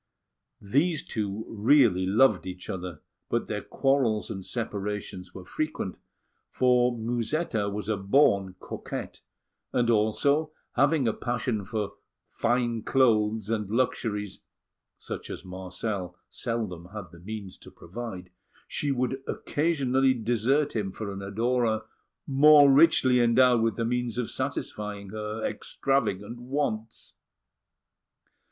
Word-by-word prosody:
These 145 - +1
two 105 0 -3
really 110 -5 +4
loved 110 -1 +4
each 90 0 -6
other, 90 -4 -6 0.3
but - - 0
their - - -3
quarrels 130 -6 +1
and 95 -3 -5
separations 100 -4 -4
were 95 - -9
frequent; 155 - -3 0.5
for 125 -1 +3
Musetta 115 0 -1
was 100 0 -5
a 110 -2 0
born 100 -3 +3
coquette, - - -6 0.5
and 120 -1 +2
also 140 +8 +2 0.2
having 140 -2 +3
a 110 - +2
passion 120 -3 -2
for 105 0 -4 0.3
fine 120 -1 0
clothes 110 -4 +2
and 105 -3 -1
luxuries 105 -4 -1 0.6
such - - -6
as - - -7
Marcel 95 0 -4
seldom 110 -8 -3
had 105 -4 -7
the 85 - -14
means 100 0 -7
to - - -12
provide, 95 -2 -8 0.4
she 145 - -1
would 130 0 -1
occasionally 135 -4 +1
desert 120 +5 +1
him 100 -3 -1
for 100 +1 -5
an 100 - -6
adorer 110 +2 0 0.4
more 145 +1 +7
richly 135 -4 +5
endowed 120 0 +5
with 115 0 +1
the 115 - -1
means 125 0 -1
of 125 -2 -2
satisfying 105 -2 -4
her 110 +1 -4
extravagant 115 -4 -1
wants. 120 -4 -3
110 Hz, 120 wpm, -27 LUFS, 100-125 Hz, 0.6 s, more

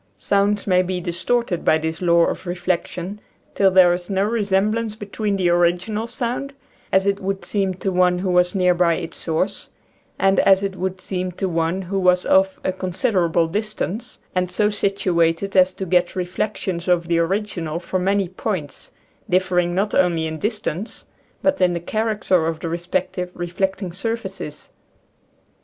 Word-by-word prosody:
Sounds 200 0 +1
may 185 -2 +4
be 185 0 -2
distorted 180 +3 -1
by 155 - +4
this 160 +2 -4
law 170 -1 +4
of - - -4
re 175 - -2
flection 180 +2 -3 0.3
till 195 - +4
there 185 -2 +6
is 175 +1 -5
no 195 0 +1
resemblance 215 +1 0
between 205 -1 -3
the 185 -2 +1
original 175 +6 +1
sound, 250 +4 -3 0.4
as 190 0 +3
it 200 0 +1
would 195 0 -3
seem 195 -3 0
to 190 +1 -2
one 180 -1 +3
who 185 +1 -1
was 180 +1 +3
near 180 -1 +4
by 170 -1 +2
its 165 - -6
source, 180 +4 -2 0.5
and 195 0 +3
as 195 0 +5
it 195 -1 -2
would 190 0 -3
seem 185 -1 -3
to 190 +2 -3
one 170 +2 -1
who 195 +2 -2
was 180 -1 +3
off 190 0 +3
a - - +1
considerable 185 -2 +1
distance, 215 +3 -4 0.2
and 180 -1 0
so 210 +2 +2
situated 195 -2 0
as 185 0 +5
to 190 - -5
get 180 0 +1
reflections 180 -1 -3
of 175 -2 +2
the 170 -1 +2
original 170 -3 -1
from 185 +1 -2
many 195 -1 +2
points, 185 -4 -5 0.4
differing 180 -1 +1
not 200 +3 0
only 175 -3 +2
in 160 0 -4
dis 210 +3 -1
tance, 185 +7 -5 0.4
but 285 -1 +2
in 180 -1 +4
the 170 - -2
character 205 -3 0
of 165 -1 -2
the - - -3
respective 180 +1 -2
reflecting 185 +2 -2
surfaces. 190 -7 -5
185 Hz, 170 wpm, -21 LUFS, 175-200 Hz, 0.5 s, there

